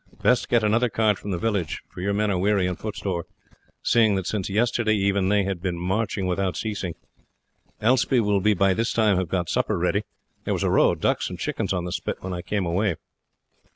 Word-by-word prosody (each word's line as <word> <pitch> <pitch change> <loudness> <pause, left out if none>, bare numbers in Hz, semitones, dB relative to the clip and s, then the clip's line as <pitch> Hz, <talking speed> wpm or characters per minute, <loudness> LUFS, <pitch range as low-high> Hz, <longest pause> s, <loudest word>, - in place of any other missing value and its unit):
Best 125 -1 +3
get 120 -2 +3
another 115 +3 +2
cart 110 -3 +1
from 105 - -7
the 95 - -1
village, 100 -5 -2
for - - -9
your 100 +2 0
men 105 +1 +1
are 95 - 0
weary 100 0 +2
and 90 0 -1
footsore, 95 -5 -4 0.6
seeing 110 -4 +4
that 95 -2 -2
since 100 -2 -2
yesterday 110 +1 +1
even 100 -1 +1
they 105 0 +3
have 95 -2 -3
been 90 -2 -2
marching 95 +2 -1
without 90 0 -1
ceasing. 100 -6 -3 0.8
Elspie 125 +2 +3
will 105 -3 +2
by 95 +1 +3
this 115 +5 -1
time 110 -4 +3
have 90 -3 -1
got 90 -1 -1
supper - - 0
ready. - - +1 0.4
There - - -1
was - - -2
a - - +1
row - - +5
of - - -8
ducks - - +1
and - - -6
chickens - - -2
on 90 -2 -1
the 90 - -4
spit 85 - -3
when 95 0 -5
I 90 - -4
came 100 0 -2
away." 90 +2 0
100 Hz, 215 wpm, -24 LUFS, 90-110 Hz, 0.8 s, row